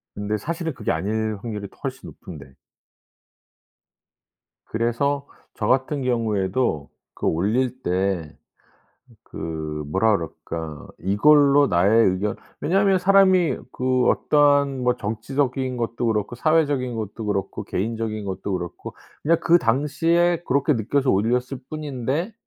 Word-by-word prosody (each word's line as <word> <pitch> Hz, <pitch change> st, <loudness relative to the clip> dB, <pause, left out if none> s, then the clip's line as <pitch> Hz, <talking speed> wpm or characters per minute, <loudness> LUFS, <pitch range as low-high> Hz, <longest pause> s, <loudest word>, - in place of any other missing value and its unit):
근데 105 Hz, +1 st, -2 dB
사실은 165 Hz, -, -4 dB
그게 -, -, -2 dB
아닐 110 Hz, +5 st, -1 dB
확률이 105 Hz, -3 st, -5 dB
더 -, -, -24 dB
훨씬 -, -, -5 dB
높은데. 65 Hz, -, -12 dB, 2.1 s
그래서 125 Hz, +5 st, -1 dB, 0.3 s
저 105 Hz, -, -2 dB
같은 130 Hz, +2 st, +1 dB
경우에도 105 Hz, -, 0 dB, 0.2 s
그 -, -, -6 dB
올릴 120 Hz, +9 st, 0 dB
때 90 Hz, -4 st, -1 dB, 0.9 s
그 75 Hz, -2 st, -5 dB
뭐라 100 Hz, +6 st, +3 dB
그럴까 80 Hz, -2 st, -6 dB
이걸로 140 Hz, -, +5 dB
나의 100 Hz, +5 st, +4 dB
의견 95 Hz, +3 st, 0 dB, 0.3 s
왜냐하면 195 Hz, +3 st, +3 dB
사람이 190 Hz, -2 st, +4 dB
그 130 Hz, 0 st, +1 dB
어떠한 145 Hz, -2 st, +3 dB
뭐 125 Hz, 0 st, +2 dB
정치적인 130 Hz, +4 st, -2 dB
것도 115 Hz, 0 st, -2 dB
그렇고 110 Hz, +1 st, -1 dB
사회적인 145 Hz, -4 st, +1 dB
것도 110 Hz, 0 st, -5 dB
그렇고 100 Hz, -2 st, -2 dB
개인적인 110 Hz, +1 st, -3 dB
것도 95 Hz, +1 st, -4 dB
그렇고 90 Hz, -2 st, -6 dB, 0.3 s
그냥 165 Hz, +2 st, +3 dB
그 175 Hz, +1 st, +5 dB
당시에 165 Hz, +7 st, +1 dB
그렇게 140 Hz, +3 st, +2 dB
느껴서 130 Hz, +4 st, +1 dB
올렸을 125 Hz, +6 st, 0 dB
뿐인데 150 Hz, -, -3 dB
120 Hz, 270 characters per minute, -23 LUFS, 100-145 Hz, 2.1 s, 이걸로